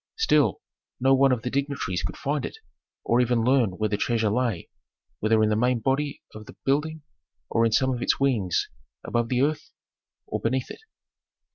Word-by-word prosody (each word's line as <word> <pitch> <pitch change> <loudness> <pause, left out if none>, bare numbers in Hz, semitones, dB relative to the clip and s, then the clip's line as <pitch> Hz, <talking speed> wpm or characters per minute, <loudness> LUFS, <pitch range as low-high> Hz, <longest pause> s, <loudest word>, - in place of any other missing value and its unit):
Still, 450 0 +2 0.4
no 135 +1 +4
one 135 0 +4
of 125 -3 0
the 125 - -3
dignitaries 140 -10 -2
could 90 - -5
find 145 +1 -2
it, - - -6 0.5
or 120 +2 +3
even 120 -2 +1
learn 125 -5 +3
where 110 - 0
the 105 -1 -1
treasure 110 -1 +1
lay, 115 -6 -1 0.5
whether 110 +1 +3
in 105 - +3
the 105 - +2
main 125 +3 +2
body 135 +5 -1
of 110 -1 -10
the - - -12
building 150 +3 0 0.5
or 115 0 +3
in - - -2
some 130 +3 +2
of 120 - -5
its - - +1
wings, 115 -10 +1 0.4
above 120 -1 -1
the 125 +1 +2
earth 150 +1 -1 0.6
or - - -3
beneath 130 +2 -1
it. - - -10
125 Hz, 185 wpm, -25 LUFS, 110-135 Hz, 0.6 s, no